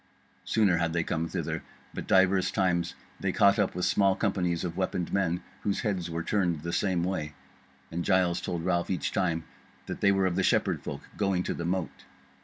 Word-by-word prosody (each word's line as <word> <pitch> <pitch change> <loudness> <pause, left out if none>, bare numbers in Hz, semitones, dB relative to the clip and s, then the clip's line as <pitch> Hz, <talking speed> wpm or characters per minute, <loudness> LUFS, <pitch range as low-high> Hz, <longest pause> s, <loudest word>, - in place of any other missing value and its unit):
Sooner 100 -6 +3
had 85 -1 0
they 85 -1 +1
came 80 0 -1
thither; - - -3 0.3
but - - -6
divers 95 0 +4
times 85 -3 0 0.2
they - - 0
caught 100 +1 +4
up 100 -4 +1
with 90 - 0
small 100 -1 +3
companies 90 -5 0
of 85 -2 -3
weaponed 90 -2 -2
men, 90 -3 +1 0.2
whose 100 -1 -1
heads 95 -7 -1
were 85 0 -3
turned 90 -5 0
the 85 +1 -4
same 90 -2 +1
way; 80 -5 -2 0.6
and 85 +1 -2
Giles 90 -2 +2
told 85 -1 -3
Ralph 85 -2 +1
each 95 - -1
time 85 -4 0 0.4
that - - -6
they 100 - +5
were 95 -1 +2
of 90 -1 0
the - - +3
Shepherd - - +2
folk - - -6 0.2
going 95 -3 +1
to - - -2
the 85 - -4
mote. 90 0 -3
90 Hz, 200 wpm, -28 LUFS, 85-95 Hz, 0.6 s, they